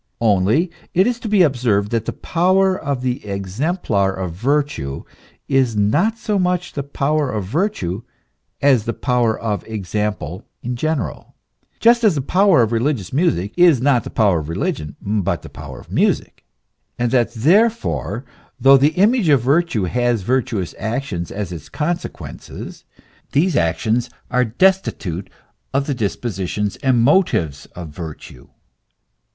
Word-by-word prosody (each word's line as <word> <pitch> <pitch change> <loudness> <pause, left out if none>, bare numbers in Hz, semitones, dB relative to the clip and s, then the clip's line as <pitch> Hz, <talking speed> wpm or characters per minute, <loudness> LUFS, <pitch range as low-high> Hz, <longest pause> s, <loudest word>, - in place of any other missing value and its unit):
Only 110 - +2 0.2
it 185 +2 +5
is 240 0 0
to 230 - -5
be 205 -3 +5
observed 120 -8 +1
that 115 -2 0
the - - -2
power 185 +2 +2
of 140 -6 -3
the 125 +1 -2
exemplar 100 - -1
of 95 -3 -4
virtue 120 - -1 0.4
is 130 -4 +2
not 170 - +2
so 210 -3 -1
much 180 -1 0
the 140 - -2
power 145 +1 -1
of 105 -5 -3
virtue 110 - -1 0.6
as 130 -6 +4
the 115 - -2
power 120 -3 +1
of 105 -3 -2
ex 105 -6 -6
ample 105 -4 -2 0.2
in 125 +1 -3
general, 155 0 -3 0.4
just 235 +1 +4
as 205 -7 +4
the 140 - 0
power 185 -4 +4
of 110 - -1
religious 115 -4 -1
music 135 - +1
is 175 -6 +5
not 130 -1 +2
the - - -7
power 100 -6 +2
of 75 0 -7
religion, 85 - -3
but 100 -2 -1
the - - -9
power - - -9
of - - -15
music;* - - 0 0.5
and 120 -1 0
that 120 -3 +2
therefore, 170 - +1 0.3
though 135 +1 +7
the 145 +4 +2
image 210 -1 +3
of 140 -5 +4
virtue 140 - +2
has 120 +2 0
virtuous 120 -5 -1
actions 110 -6 -3
as 100 -3 -4
its 85 -5 -8
consequences, 170 +3 -5 0.5
these 160 +3 +2
actions 110 +8 +1 0.2
are 125 0 +3
destitute 115 - 0 0.5
of 140 0 +2
the 145 - -1
dispositions 105 -3 -2
and 130 -4 +2
motives 115 - +2
of 85 -3 -7
virtue. 75 -5 -9
125 Hz, 150 wpm, -19 LUFS, 100-160 Hz, 0.6 s, though